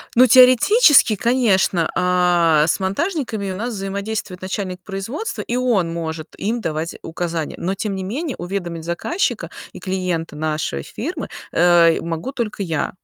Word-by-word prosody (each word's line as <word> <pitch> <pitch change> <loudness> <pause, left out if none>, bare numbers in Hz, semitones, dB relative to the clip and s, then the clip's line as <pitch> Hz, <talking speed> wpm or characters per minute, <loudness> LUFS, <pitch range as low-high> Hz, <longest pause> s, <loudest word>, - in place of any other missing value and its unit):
Ну, 255 +2 +7
теоретически, 255 - +6
конечно, 200 -7 +2
э, 175 -4 +3
с - - +1
монтажниками 215 - -2
у - - -5
нас 235 +5 -3
взаимодействует 200 -1 -4
начальник 185 -1 -4
производства, 205 - -5
и 240 - -3
он 230 -9 +1
может 160 -2 -5
им 230 +4 -2
давать 160 -2 -3
указания. 165 -1 -4
Но 185 +3 -2
тем 200 0 -3
не 190 - -4
менее 265 - -3
уведомить 175 -2 -4
заказчика 250 - -2 0.2
и - - -10
клиента 180 -4 -3
нашей 155 - -2
фирмы, - - -5 0.2
э, 170 -1 +5
могу 165 +10 -4
только 230 -6 -4
я. 165 -4 -2
190 Hz, 145 wpm, -20 LUFS, 170-230 Hz, 0.2 s, Ну